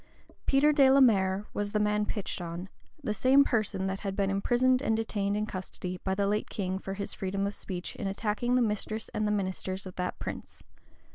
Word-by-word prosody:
Peter 290 Hz, +2 st, +5 dB
de 275 Hz, -2 st, +6 dB
la 270 Hz, +1 st, +6 dB
Mare 195 Hz, -5 st, +4 dB
was 205 Hz, 0 st, -2 dB
the 210 Hz, -, +2 dB
man 210 Hz, 0 st, +1 dB
pitched 205 Hz, -3 st, -3 dB
on; 175 Hz, +2 st, -5 dB, 0.3 s
the 215 Hz, -, 0 dB
same 265 Hz, +5 st, +5 dB
person 215 Hz, -7 st, 0 dB
that 190 Hz, 0 st, -2 dB
had 195 Hz, -2 st, -3 dB
been 195 Hz, -1 st, +1 dB
imprisoned 245 Hz, +6 st, +2 dB
and 225 Hz, -5 st, +1 dB
detained 205 Hz, -2 st, -1 dB
in 210 Hz, -, 0 dB
custody 185 Hz, -2 st, -6 dB
by 190 Hz, 0 st, 0 dB
the 200 Hz, 0 st, +1 dB
late 210 Hz, +2 st, 0 dB
king 190 Hz, -2 st, -2 dB
for 195 Hz, 0 st, -5 dB
his 200 Hz, 0 st, -4 dB
freedom 195 Hz, +1 st, -2 dB
of 200 Hz, -, -2 dB
speech, 180 Hz, -3 st, -5 dB
in -, -, -3 dB
attacking 210 Hz, +5 st, 0 dB
the 250 Hz, -, +4 dB
mistress 215 Hz, 0 st, -2 dB
and 215 Hz, 0 st, -1 dB
the -, -, +1 dB
ministers 190 Hz, -1 st, -2 dB
of 185 Hz, -, -8 dB
that 180 Hz, 0 st, -2 dB
prince. -, -, -7 dB
205 Hz, 210 wpm, -29 LUFS, 190-220 Hz, 0.3 s, de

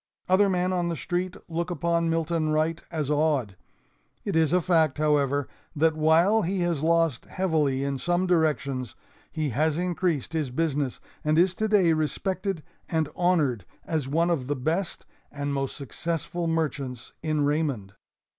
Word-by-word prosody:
Other 195 Hz, +2 st, +4 dB
men 180 Hz, 0 st, +1 dB
on 175 Hz, -1 st, 0 dB
the 170 Hz, -, -1 dB
street 180 Hz, +3 st, -3 dB
look 170 Hz, +1 st, -2 dB
upon 170 Hz, 0 st, 0 dB
Milton 165 Hz, -1 st, 0 dB
Wright 155 Hz, +2 st, +1 dB
as 155 Hz, -4 st, -2 dB
odd. 145 Hz, -9 st, +1 dB, 0.7 s
It -, -, -1 dB
is 160 Hz, -2 st, +3 dB
a 180 Hz, -, +4 dB
fact, 160 Hz, -5 st, +2 dB
however, 145 Hz, -2 st, +2 dB, 0.3 s
that 160 Hz, +1 st, +3 dB
while 165 Hz, +8 st, +4 dB
he 185 Hz, +1 st, -1 dB
has 170 Hz, -4 st, 0 dB
lost 165 Hz, -4 st, +2 dB
heavily 155 Hz, -8 st, 0 dB
in 140 Hz, -1 st, -2 dB
some 175 Hz, +5 st, +1 dB
directions, 140 Hz, -, 0 dB, 0.4 s
he 155 Hz, -2 st, -1 dB
has 150 Hz, +5 st, +1 dB
increased 175 Hz, -4 st, -1 dB
his 155 Hz, -5 st, -1 dB
business, 145 Hz, -1 st, -1 dB, 0.2 s
and 155 Hz, +1 st, +2 dB
is 180 Hz, +2 st, +4 dB
today 205 Hz, -5 st, +3 dB
respected 185 Hz, +3 st, -2 dB, 0.3 s
and 160 Hz, -3 st, 0 dB
honored 155 Hz, -, +2 dB, 0.2 s
as 155 Hz, -5 st, -1 dB
one 165 Hz, +5 st, +2 dB
of 135 Hz, -7 st, -1 dB
the 145 Hz, -, 0 dB
best 165 Hz, +8 st, -2 dB, 0.3 s
and 145 Hz, 0 st, -3 dB
most 135 Hz, -1 st, -2 dB
successful 165 Hz, +4 st, -3 dB
merchants 140 Hz, -7 st, -2 dB
in 155 Hz, -2 st, 0 dB
Raymond. 145 Hz, -10 st, -1 dB
160 Hz, 155 wpm, -26 LUFS, 145-175 Hz, 0.7 s, Other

